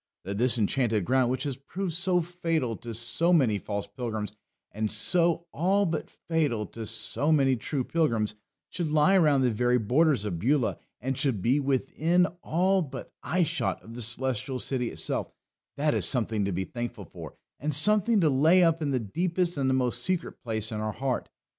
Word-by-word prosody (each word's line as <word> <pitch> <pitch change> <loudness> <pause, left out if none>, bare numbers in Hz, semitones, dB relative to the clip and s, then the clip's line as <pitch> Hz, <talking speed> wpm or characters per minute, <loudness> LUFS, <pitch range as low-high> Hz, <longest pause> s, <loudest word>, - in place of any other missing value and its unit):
That 100 +2 -4
this 125 0 +4
Enchanted 110 -2 +1
Ground, 130 +1 +2
which 130 - -1
has 140 -4 -3
proved 175 +6 -4
so 180 +1 +2
fatal 165 -8 -2
to 120 - -8
so 120 +10 0
many 125 - +3
false 100 -1 -4
pilgrims, 110 -5 -5 0.4
and 110 0 -2
so 170 - +1
all 195 +6 +2
but 160 -3 -3
fatal 145 -10 -1
to 115 0 -7
so 115 +7 -1
many 135 -4 +4
true 130 +3 -3
pilgrims, 115 -10 0 0.4
should 170 -4 -2
lie 155 +5 +4
around 150 -7 +4
the 125 -2 +2
very 125 +3 +2
borders 125 +1 +2
of 90 -5 -3
Beulah, 130 - +1 0.2
and 130 +3 -2
should 130 -6 0
be 125 +9 +2
within 145 +6 +1 0.2
all 185 +4 +2
but 145 -6 -7
eye 180 +1 +1
shot 165 +1 -1
of 115 - -11
the 120 - -7
Celestial 130 +2 0
City 125 -1 -2
itself, - - -3 0.5
that 150 +1 +1
is - - +3
something 110 -5 0
to 100 - -1
be 95 +1 -1
thankful 120 -1 -6
for, - - -10 0.2
and 150 +2 -1
something 210 - +4
to 160 - +4
lay 160 +7 +5
up 165 -1 +2
in 150 - -1
the 130 -2 +1
deepest 175 - -1
and 135 -2 0
the - - +2
most 125 -2 0
secret 185 +6 -3
place 110 -3 -2
in 110 - -3
our 110 0 -2
heart. 135 -2 -2
130 Hz, 190 wpm, -27 LUFS, 115-165 Hz, 0.5 s, lay